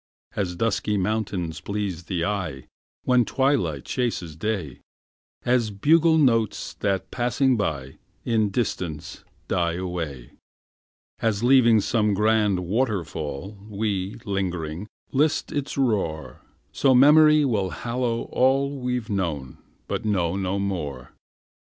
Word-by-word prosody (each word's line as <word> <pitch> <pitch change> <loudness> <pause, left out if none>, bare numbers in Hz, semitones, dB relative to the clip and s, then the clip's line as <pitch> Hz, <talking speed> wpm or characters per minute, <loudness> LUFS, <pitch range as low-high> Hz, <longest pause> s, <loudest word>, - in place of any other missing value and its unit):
As 90 -4 -2
dusky 105 +1 0
mountains 95 -5 -2
please 100 -5 -4
the 85 -3 -1
eye 90 -10 -3 0.4
When 125 -1 +4
twilight 120 - 0
chases 110 - -2
day; 90 - -3 0.7
As 120 -3 +2
bugle 160 +10 +4
notes 115 -8 +1
that, 100 -2 -1
passing 125 +2 +1
by, 70 - -3 0.3
In 110 -3 +2
distance 90 -7 -3 0.2
die 85 -2 0
away; 85 -8 -5 0.9
As, 110 -1 0
leaving 120 -4 +5
some 105 -1 +1
grand 105 -2 +2
waterfall, 95 - -2
We, 100 -2 -2
lingering, 90 -3 -3 0.2
list 150 +3 +1
its 145 -1 -3
roar 100 -12 -1 0.3
So 135 -2 +3
memory 150 +3 +7
will 105 -7 0
hallow 120 +2 -2
all 135 +2 +2
We've 125 -2 -2
known 85 - -3 0.3
but - - -3
know 95 -5 0
no 95 0 -1
more. 75 -11 -4
105 Hz, 115 wpm, -24 LUFS, 90-120 Hz, 0.9 s, memory